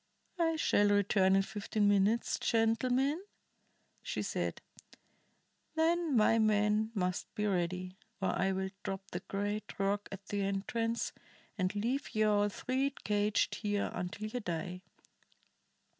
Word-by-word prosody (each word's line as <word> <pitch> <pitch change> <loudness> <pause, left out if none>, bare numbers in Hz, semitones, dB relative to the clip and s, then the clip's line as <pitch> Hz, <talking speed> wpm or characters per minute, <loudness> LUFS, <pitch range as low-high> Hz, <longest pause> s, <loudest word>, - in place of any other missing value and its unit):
"I 325 -1 +2
shall 205 -9 +3
return 200 -1 +4
in 195 - +4
fifteen 205 0 -1
minutes, 205 +3 +2
gentlemen," 250 - +2 0.8
she - - -3
said. - - -2 1.2
"Then 325 -3 +2
my 225 +1 +5
man 215 0 +3
must 180 -2 -1
be 210 - -1
ready, 185 0 -1 0.2
or 190 - 0
I 190 +1 +1
will 190 0 -2
drop 195 0 -5
the 175 - -3
great 205 +2 -4
rock 200 +1 0
at 195 0 -8
the 205 +1 -2
entrance, 225 +4 -1 0.4
and 185 -1 -1
leave 235 +7 -2
ye 215 - +3
all 205 -1 +3
three 260 +6 0
caged 205 0 +1
here 205 -2 0
until 180 +4 -4
ye 245 +3 -3
die. 180 -2 -4
205 Hz, 130 wpm, -33 LUFS, 195-225 Hz, 1.2 s, my